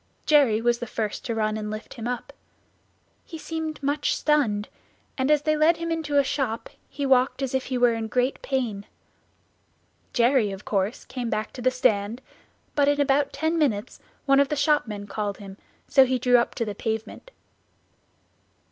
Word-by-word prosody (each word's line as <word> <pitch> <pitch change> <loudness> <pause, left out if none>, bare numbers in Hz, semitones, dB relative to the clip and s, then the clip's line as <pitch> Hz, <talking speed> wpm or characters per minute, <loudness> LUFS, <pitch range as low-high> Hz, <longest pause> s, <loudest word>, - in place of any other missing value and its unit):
Jerry 270 -8 +4
was 240 0 +2
the 240 - -5
first 215 -1 -3
to 230 - -2
run 215 -1 0
and 210 -1 -4
lift 215 +1 -7
him 230 -2 -6
up. 245 -1 -4 0.9
He 325 - -9
seemed 315 -1 -5
much 285 +1 0
stunned, 230 -9 +1 0.5
and 260 +1 0
as 300 -1 +3
they 310 0 +2
led 310 +2 +4
him 335 0 -3
into 310 -3 -1
a 280 - +6
shop 260 -5 -2 0.2
he 285 - -4
walked 265 +1 +2
as 265 - -2
if 265 0 0
he 255 - -2
were 245 -1 +4
in 225 -1 -3
great 250 +4 0
pain. 235 -7 -2 1.2
Jerry 240 -2 +3
of 195 +1 -8
course 200 +2 -1
came 250 -3 -4
back 215 -1 -3
to 255 - -8
the 255 - +3
stand, 220 -3 +1 0.5
but 285 -1 +2
in 290 0 +2
about 280 0 +2
ten 320 +2 -1
minutes 220 -9 -1 0.3
one 275 -1 +5
of 280 -1 +3
the 300 - 0
shopmen 275 -9 0
called 205 0 -3
him, 195 -2 -10 0.3
so 270 - +6
we 260 0 +1
drew 245 0 +4
up 235 - -2
to 230 - -1
the 210 - -4
pavement. 220 - -5
250 Hz, 185 wpm, -25 LUFS, 220-285 Hz, 1.2 s, a